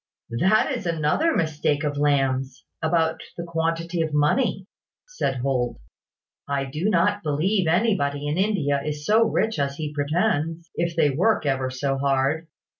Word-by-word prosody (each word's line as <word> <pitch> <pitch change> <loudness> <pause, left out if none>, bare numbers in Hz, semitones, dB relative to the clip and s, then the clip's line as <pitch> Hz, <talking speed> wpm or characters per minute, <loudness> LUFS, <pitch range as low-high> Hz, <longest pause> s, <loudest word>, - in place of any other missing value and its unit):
"That 200 +7 +3
is - - -3
another 165 - +1
mistake 150 -2 0
of 145 -1 -1
Lamb's, 135 -2 0 0.2
about 160 0 +1 0.2
the 170 - -4
quantity 165 0 -1
of 160 -2 -1
money," 185 - +1 0.4
said - - -2
Holt. 125 - -1 0.7
"I 140 -1 0
do 155 +9 -2
not 205 +2 +2
believe 170 +5 +1
anybody 160 -6 +1
in 145 - 0
India 170 -8 +1
is 150 0 -4
so 220 +5 +5
rich 220 -4 0
as 140 0 -1
he 150 0 -5
pretends, 160 +1 -1
if 170 -1 -2
they 150 -3 +3
work 185 +5 +1
ever 135 -2 0
so 135 +1 -2
hard. 140 +4 +1
155 Hz, 150 wpm, -24 LUFS, 140-175 Hz, 0.7 s, so